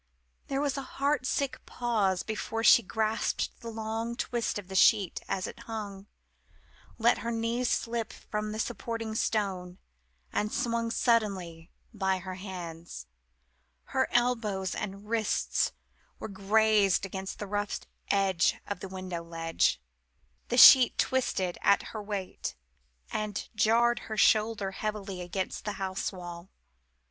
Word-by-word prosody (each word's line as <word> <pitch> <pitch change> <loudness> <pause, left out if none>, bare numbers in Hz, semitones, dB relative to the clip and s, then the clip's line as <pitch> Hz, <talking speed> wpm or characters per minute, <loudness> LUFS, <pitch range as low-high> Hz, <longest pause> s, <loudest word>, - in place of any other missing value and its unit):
There 275 0 -1
was 285 -1 0
a - - -2 0.2
heart 280 -1 +1
sick 280 -2 -1
pause 210 -7 0
before 220 +1 -3
she 235 - +8
grasped 220 +1 -1
the 235 - -7
long 225 +1 -3
twist 235 -2 -2
of 200 -3 -7
the 190 - -8
sheet 195 0 +4
as 185 - -1
it - - -8
hung 205 -3 -6 0.9
let 235 +1 +3
her 235 - -3
knees 235 +2 0
slip 230 -1 -1
from 210 0 -4
the 215 - -4
supporting 225 0 -3
stone 190 -5 -1 0.6
and 210 +1 0
swung 230 -1 0
suddenly, 195 -9 0 0.2
by 190 -3 0
her 185 0 -6
hands. 175 -3 -7 0.9
Her 260 -1 +2
elbows 225 -6 +1
and 200 0 -5
wrists 225 -1 +1 0.5
were - - -6
grazed 205 0 +3
against 190 0 -5
the 210 - -5
rough 205 +1 -2 0.3
edge 195 -3 +3
of 205 - -4
the 195 - -7
window 185 -2 -5
ledge 165 - 0 0.7
the 245 - -1
sheet 255 0 +9
twisted 190 -9 0
at 200 - +4
her 215 - -4
weight, 200 -3 -4 0.6
and 210 -2 -3
jarred 235 +2 +3
her 220 - -6
shoulder 215 -1 +3
heavily 200 -2 -4
against 180 +2 -3
the 210 - -3
house 190 0 -3
wall. 175 -1 -9
210 Hz, 135 wpm, -29 LUFS, 190-230 Hz, 0.9 s, sheet